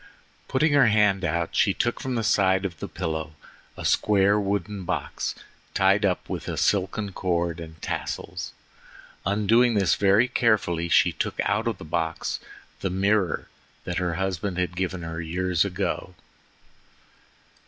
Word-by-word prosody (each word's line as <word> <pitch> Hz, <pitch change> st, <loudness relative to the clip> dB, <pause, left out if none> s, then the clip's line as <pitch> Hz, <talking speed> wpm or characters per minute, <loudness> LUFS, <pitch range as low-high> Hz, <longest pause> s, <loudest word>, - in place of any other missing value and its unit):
Putting 145 Hz, +3 st, +2 dB
her 140 Hz, -4 st, +6 dB
hand 105 Hz, -3 st, +3 dB
out, 85 Hz, 0 st, -1 dB
she 100 Hz, -, +3 dB
took 120 Hz, -, 0 dB
from 130 Hz, -1 st, -3 dB
the 115 Hz, -, 0 dB
side 95 Hz, -1 st, +3 dB
of 85 Hz, -5 st, -5 dB
the -, -, -4 dB
pillow 80 Hz, -3 st, -4 dB, 0.4 s
a -, -, -6 dB
square 100 Hz, 0 st, +3 dB
wooden 100 Hz, 0 st, -2 dB
box 85 Hz, -, -3 dB, 0.4 s
tied 100 Hz, +2 st, +4 dB
up 90 Hz, -2 st, 0 dB
with -, -, -5 dB
a -, -, -3 dB
silken 100 Hz, +1 st, 0 dB
cord 85 Hz, -2 st, -1 dB
and 80 Hz, -1 st, -9 dB
tassels. -, -, -4 dB, 0.8 s
Undoing 110 Hz, +4 st, +3 dB
this 95 Hz, -5 st, +3 dB
very 100 Hz, +5 st, +4 dB
carefully, 105 Hz, -9 st, +1 dB
she -, -, +5 dB
took -, -, -3 dB
out 105 Hz, +3 st, 0 dB
of 115 Hz, -, -1 dB
the -, -, -10 dB
box 80 Hz, +1 st, -2 dB, 0.4 s
the 95 Hz, -, -1 dB
mirror 95 Hz, 0 st, +1 dB, 0.4 s
that 90 Hz, 0 st, -2 dB
her 90 Hz, -2 st, -1 dB
husband 95 Hz, 0 st, -2 dB
had 90 Hz, -1 st, -1 dB
given 95 Hz, -1 st, -2 dB
her 80 Hz, 0 st, -4 dB
years 85 Hz, +1 st, 0 dB
ago. 95 Hz, -1 st, -3 dB
95 Hz, 150 wpm, -25 LUFS, 85-105 Hz, 0.8 s, her